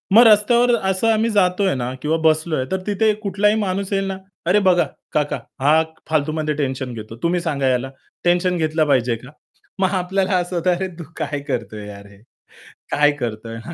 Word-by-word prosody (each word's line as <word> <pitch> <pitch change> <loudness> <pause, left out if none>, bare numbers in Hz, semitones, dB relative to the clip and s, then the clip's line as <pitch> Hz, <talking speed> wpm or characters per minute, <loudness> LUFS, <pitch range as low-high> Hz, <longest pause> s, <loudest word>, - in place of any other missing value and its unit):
मग 235 - +10
रस्त्यावर 235 +3 +5
असं 190 +4 +1
आम्ही 220 +1 +1
जातोय 190 -3 +2
ना 125 0 -3
किंवा 160 +2 +1
बसलोय, 155 -3 +2
तर 190 - 0
तिथे 215 +1 +2
कुठलाही 205 +2 +2
माणूस 195 0 -2
येईल 195 0 +1
ना, 190 -1 -3 0.3
"अरे 190 +4 +4
बघा, 175 -1 +4 0.3
काका, 150 -1 0 0.2
हा 150 +4 +4 0.3
फालतूमध्ये 155 0 0
टेन्शन 130 -3 -3
घेतो. 110 0 -8
तुम्ही 175 +1 +2
सांगा 140 -6 -1
याला. 130 +1 -1 0.3
टेन्शन 180 +1 +2
घेतलं 155 -1 +1
पाहिजे 125 -4 +2
का?" 125 +4 -12 0.5
मग 190 -1 +3
आपल्याला 190 +1 0
असं 180 0 -2
होतं, 175 +2 +1
"अरे 190 +2 -3
तू - - -5
काय 145 - -3
करतोय 110 -4 -4
यार 100 0 -10
हे?" 100 0 -17 0.7
"काय 150 0 +4
करतोय 115 -2 -5
हा!" 170 - -7
165 Hz, 180 wpm, -20 LUFS, 135-190 Hz, 0.7 s, मग